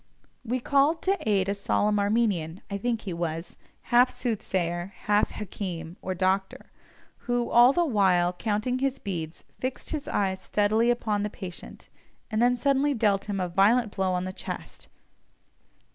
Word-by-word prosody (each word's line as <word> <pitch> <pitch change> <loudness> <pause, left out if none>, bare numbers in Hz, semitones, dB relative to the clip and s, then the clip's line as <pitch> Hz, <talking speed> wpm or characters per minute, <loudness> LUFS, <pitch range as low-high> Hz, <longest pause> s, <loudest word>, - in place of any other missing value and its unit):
We 245 +2 -1
called 285 +6 +2
to 380 - 0
aid 195 -2 +2
a 200 - +1
solemn 205 +1 +1
Armenian 200 -5 0
(I 200 - -2
think 230 +1 -1
he 190 - -5
was) 165 0 -4 0.4
half 245 +1 +6
soothsayer, 190 -7 -2
half 210 0 +3
hakim, 175 -5 -6
or 185 - -3
doctor, 190 +1 -1 0.6
who, 245 -1 0
all 240 +2 +7
the 345 +4 +2
while 185 - +3
counting 215 +6 -1
his 270 0 0
beads, 170 -7 -5 0.2
fixed 255 +1 -4
his 305 -2 -3
eyes 190 -2 -1
steadily 215 +4 +2
upon 220 -4 0
the 210 - -1
patient, 185 -4 -9 0.4
and 215 +1 +1
then 245 +1 +4
suddenly 280 +3 +2
dealt 205 -4 +1
him 205 -2 -3
a 180 - 0
violent 210 +5 +3
blow 190 -1 0
on 180 0 -1
the 185 - -5
chest. - - -8
205 Hz, 160 wpm, -27 LUFS, 185-240 Hz, 0.6 s, all